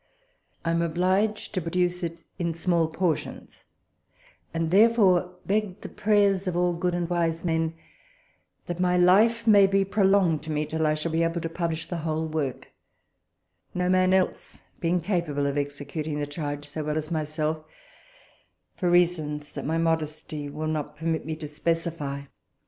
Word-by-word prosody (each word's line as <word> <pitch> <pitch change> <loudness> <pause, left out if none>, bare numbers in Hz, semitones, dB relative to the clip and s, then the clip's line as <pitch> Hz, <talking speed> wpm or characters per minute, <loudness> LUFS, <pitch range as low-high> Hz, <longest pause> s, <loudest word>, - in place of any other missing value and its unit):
I 165 - +1
am 165 0 +1
obliged 185 +6 0
to 185 - -1
produce 180 +2 0
it 170 -1 -3 0.2
in 170 -2 -1
small 170 -1 +2
portions, 165 -1 -3 0.9
and 165 -1 -1
therefore 190 -4 +4
beg 205 -2 -1
the - - -7
prayers 200 -2 +2
of 175 -1 -1
all 175 0 +2
good 175 +1 -1
and 175 -1 -1
wise 170 -1 -1
men 165 -1 0 0.9
that 175 0 -5
my 180 0 +2
life 215 +6 +4
may 205 -3 +7
be 195 0 +2
prolonged 195 -5 +3
to 160 - -4
me, 150 0 0
till 160 +1 0
I 155 - +2
shall 155 +2 -3
be 165 +1 +1
able 165 +1 0
to 165 - -3
publish 165 -1 -2
the 175 - -3
whole 160 0 -2
work, 150 -5 -3 1.0
no 180 0 0
man 185 0 +4
else 190 -1 0 0.2
being 175 +1 +1
capable 165 -6 -1
of 140 0 -1
executing 145 +1 -3
the 145 - -1
charge 145 -1 -5
so 155 +1 -5
well 150 +1 -1
as 155 +1 -3
myself, 155 0 -2 1.1
for 180 - +1
reasons 160 -4 +1
that - - -5
my 160 +1 0
modesty 155 -2 -2
will 155 +2 -5
not 150 -1 -3
permit 160 0 -2
me 160 - -2
to 155 -1 -7
specify. 150 -2 -2
165 Hz, 165 wpm, -26 LUFS, 155-180 Hz, 1.1 s, may